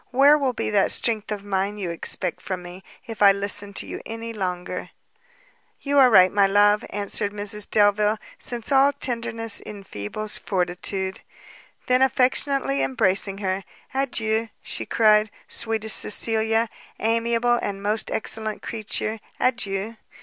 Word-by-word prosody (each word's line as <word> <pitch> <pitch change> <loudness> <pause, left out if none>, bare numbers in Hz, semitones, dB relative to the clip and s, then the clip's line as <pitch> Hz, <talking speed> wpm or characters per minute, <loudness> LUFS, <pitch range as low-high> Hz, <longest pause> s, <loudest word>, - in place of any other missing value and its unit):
where 275 +4 +6
will 275 -3 +1
be 235 - -3
that 200 -2 +3
strength 220 -2 0
of 205 -2 -4
mind 200 +1 -2
you 180 -4 -3
expect 170 +1 -2
from 185 -2 -5
me, 175 +2 -10 0.2
if 225 -2 -8
I 200 -1 +8
listen 200 0 -1
to - - -2
you - - -7
any 230 +1 -6
longer!" 180 -4 -4 0.9
"You 285 0 +1
are 260 -2 +7
right, 185 -5 +6
my 200 -1 +4
love," 205 +2 +4
answered 205 0 -3
Mrs 205 0 -2
Delvile, 210 +1 +3 0.2
"since 240 +1 -5
all 275 +1 +5
tenderness 230 -4 -1
enfeebles 200 - -4
fortitude." 190 +1 -2 0.6
Then 255 0 +2
affectionately 260 - +1
embracing 185 +9 +1
her, 190 +1 -1 0.3
"Adieu," 230 -4 0
she - - -4
cried, 215 -1 +4 0.2
"sweetest 220 -1 +1
Cecilia, 225 +1 +1 0.3
amiable 230 +2 +1
and 195 0 -4
most 210 +2 -1
excellent 220 -1 -3
creature, 220 0 -3 0.2
adieu! 220 -3 -1
215 Hz, 135 wpm, -23 LUFS, 195-230 Hz, 0.9 s, I